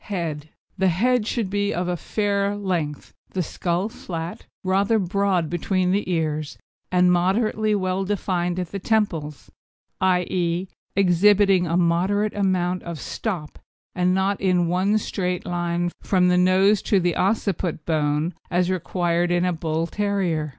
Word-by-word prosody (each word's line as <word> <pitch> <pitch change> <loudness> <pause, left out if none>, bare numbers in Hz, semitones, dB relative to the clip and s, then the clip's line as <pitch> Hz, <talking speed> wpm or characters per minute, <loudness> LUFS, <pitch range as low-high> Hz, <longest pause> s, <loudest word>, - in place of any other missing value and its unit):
HEAD 160 -6 -4 0.3
The 190 - +3
head 225 +6 +2
should 230 -4 -1
be 205 0 0
of 175 +1 -1
a 180 - 0
fair 200 +2 -1
length; 175 -8 -3 0.2
the 185 - 0
skull 175 +4 -2
flat, 170 -6 -7 0.2
rather 195 +4 +2
broad 195 -3 +1
between 180 +2 0
the 200 0 0
ears, 155 -3 -2 0.3
and 180 0 +4
moderately 210 +4 +1
well 185 -1 -1
defined 180 -3 -1
at 180 -2 -3
the 200 - -4
temples 175 -9 -1 0.5
i.e. 180 -1 +1 0.3
exhibiting 195 0 +4
a 165 +1 +1
moderate 185 +5 +1
amount 185 -2 0
of 170 -3 -6
stop 175 -6 -5 0.3
and 180 0 +1
not 190 +1 0
in 180 -2 +2
one 185 +5 +2
straight 180 -4 -2
line 175 0 -1
from 180 -2 +2
the 180 - +3
nose 190 +3 +4
to 200 - +2
the 175 -2 0
occiput 190 -5 -1
bone 155 +1 0 0.2
as 180 0 +1
required 175 -1 0
in 175 0 +2
a 180 - +1
Bull 160 0 -1
terrier. 185 -6 -1
180 Hz, 145 wpm, -23 LUFS, 170-200 Hz, 0.5 s, and